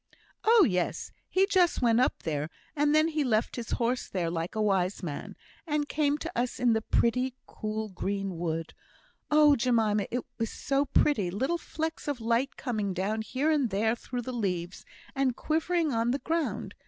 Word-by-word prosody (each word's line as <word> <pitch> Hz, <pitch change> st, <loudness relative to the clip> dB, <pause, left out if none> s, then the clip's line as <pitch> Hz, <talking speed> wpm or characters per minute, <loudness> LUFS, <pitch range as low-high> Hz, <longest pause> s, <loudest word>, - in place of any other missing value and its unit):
"Oh, 445 Hz, -3 st, +6 dB
yes! 180 Hz, -3 st, -1 dB, 0.2 s
he 380 Hz, +1 st, +3 dB
just 360 Hz, -7 st, +2 dB
went 230 Hz, -1 st, +4 dB
up 255 Hz, -, +1 dB
there; 150 Hz, -1 st, -2 dB, 0.3 s
and 295 Hz, 0 st, +3 dB
then 310 Hz, +1 st, +4 dB
he 310 Hz, -2 st, 0 dB
left 225 Hz, -4 st, +1 dB
his 235 Hz, -2 st, -5 dB
horse 245 Hz, +1 st, 0 dB
there, 175 Hz, -3 st, -1 dB
like 165 Hz, +4 st, -3 dB
a -, -, -1 dB
wise 190 Hz, -2 st, +1 dB
man, 150 Hz, -5 st, -5 dB, 0.3 s
and 295 Hz, -1 st, 0 dB
came 295 Hz, -1 st, +1 dB
to 335 Hz, +2 st, -5 dB
us 245 Hz, +1 st, -1 dB
in 245 Hz, -2 st, +4 dB
the 220 Hz, -, +1 dB
pretty, 250 Hz, +3 st, +1 dB
cool, 215 Hz, 0 st, -4 dB
green 195 Hz, -1 st, -3 dB
wood. 165 Hz, -1 st, -3 dB, 0.6 s
Oh, 300 Hz, -1 st, +6 dB
Jemima, 225 Hz, -5 st, +2 dB
it 245 Hz, 0 st, -3 dB
was 225 Hz, -1 st, 0 dB
so 275 Hz, 0 st, 0 dB
pretty 260 Hz, -8 st, +2 dB
little 265 Hz, -, -1 dB
flecks 320 Hz, -1 st, -4 dB
of 285 Hz, -4 st, -2 dB
light 235 Hz, +4 st, 0 dB
coming 210 Hz, -7 st, -2 dB
down 205 Hz, +4 st, -1 dB
here 265 Hz, +7 st, 0 dB
and 285 Hz, -6 st, +2 dB
there 220 Hz, +3 st, +1 dB
through 245 Hz, +1 st, -5 dB
the 255 Hz, -, -5 dB
leaves, 185 Hz, -6 st, -3 dB, 0.3 s
and 270 Hz, -3 st, +1 dB
quivering 325 Hz, +1 st, 0 dB
on 230 Hz, +1 st, +1 dB
the 260 Hz, -, +1 dB
ground. 325 Hz, +2 st, -2 dB
240 Hz, 180 wpm, -29 LUFS, 205-290 Hz, 0.6 s, Oh